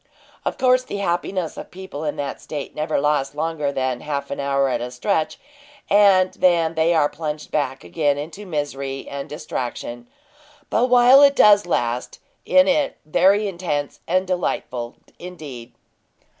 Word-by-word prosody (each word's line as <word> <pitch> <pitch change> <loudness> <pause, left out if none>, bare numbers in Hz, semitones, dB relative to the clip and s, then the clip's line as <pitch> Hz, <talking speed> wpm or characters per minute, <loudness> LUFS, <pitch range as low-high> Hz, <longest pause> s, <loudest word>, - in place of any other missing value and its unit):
Of - - -2
course 255 0 +4
the 255 - -6
happiness 180 -2 -2
of - - -8
people 180 -5 -8
in 150 - -2
that 140 -1 -5
state 145 -3 -6
never 155 0 -1
lasts 145 -1 0
longer 155 -2 -1
than 130 -2 -2
half 145 -2 -4
an - - -4
hour 140 0 +1
at 125 -2 -1
a 120 - -4
stretch, 155 +5 -1 0.5
and 195 -2 +5
then 170 -3 +2
they 165 +1 +2
are 150 -2 +4
plunged 150 0 -6
back 135 -3 -2
again 145 -3 0
into 170 +8 -7
misery 140 -4 -4
and 140 0 -6
distraction; 120 -5 -5 0.6
but 250 +2 +2
while 250 +2 +7
it 280 0 +6
does 205 -5 +6
last, 120 -6 -1 0.3
it 275 0 +5
in, 285 0 +2
very 195 +7 +3
intense 170 -6 -3
and 185 +2 +1
delightful 130 -9 -3 0.2
indeed. 145 -9 -9
155 Hz, 155 wpm, -22 LUFS, 140-185 Hz, 0.6 s, while